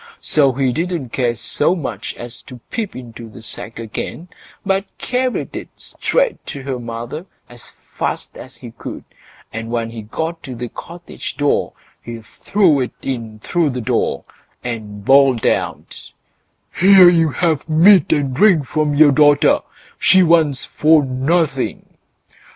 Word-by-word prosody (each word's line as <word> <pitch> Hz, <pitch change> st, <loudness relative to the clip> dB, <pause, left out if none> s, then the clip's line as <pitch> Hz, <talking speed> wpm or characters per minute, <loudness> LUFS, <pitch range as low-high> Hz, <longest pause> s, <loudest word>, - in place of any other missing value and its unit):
So 140 Hz, -3 st, +2 dB
he 130 Hz, 0 st, 0 dB
didn't 165 Hz, -4 st, -3 dB
care 120 Hz, -1 st, -1 dB
so 145 Hz, +8 st, 0 dB
much 120 Hz, -, -5 dB
as 120 Hz, 0 st, -8 dB
to 125 Hz, -, -9 dB
peep 225 Hz, -4 st, -4 dB
into 120 Hz, -2 st, -9 dB
the 110 Hz, +1 st, -13 dB
sack 115 Hz, -, -7 dB
again, 115 Hz, +9 st, -6 dB, 0.4 s
but 195 Hz, 0 st, +1 dB
carried 255 Hz, 0 st, -2 dB
it -, -, -6 dB
straight -, -, -1 dB
to 140 Hz, -4 st, -7 dB
her 130 Hz, -2 st, -4 dB
mother 120 Hz, +8 st, -6 dB, 0.2 s
as 120 Hz, -1 st, -14 dB, 0.2 s
fast -, -, -3 dB
as -, -, -11 dB
he -, -, -11 dB
could, -, -, -8 dB, 0.5 s
and 115 Hz, +1 st, -5 dB
when 115 Hz, -1 st, -2 dB
he 115 Hz, -1 st, -7 dB
got 160 Hz, +10 st, -4 dB
to 130 Hz, -3 st, -8 dB
the 120 Hz, 0 st, -5 dB
cottage 170 Hz, +7 st, -9 dB
door 145 Hz, -1 st, 0 dB, 0.3 s
he 115 Hz, -1 st, -8 dB, 0.2 s
threw 185 Hz, -8 st, +3 dB
it 125 Hz, -, -2 dB
in 115 Hz, -5 st, -4 dB
through 170 Hz, +2 st, 0 dB
the 125 Hz, -2 st, -4 dB
door, 110 Hz, -, -1 dB, 0.4 s
and 105 Hz, -4 st, -6 dB
bawled 135 Hz, -3 st, +4 dB
out: -, -, -2 dB, 0.7 s
"Here 190 Hz, 0 st, +7 dB
you 165 Hz, -2 st, +4 dB
have 160 Hz, -1 st, -1 dB
meat 170 Hz, +2 st, +5 dB
and 140 Hz, -3 st, +1 dB
drink 165 Hz, -1 st, +4 dB
from 150 Hz, +1 st, -1 dB
your 150 Hz, 0 st, +6 dB
daughter; 145 Hz, +1 st, +4 dB, 0.4 s
she 190 Hz, -1 st, +5 dB
wants 160 Hz, -5 st, +2 dB
for 155 Hz, -1 st, +3 dB
nothing." 135 Hz, +2 st, -1 dB
140 Hz, 150 wpm, -18 LUFS, 120-170 Hz, 0.7 s, Here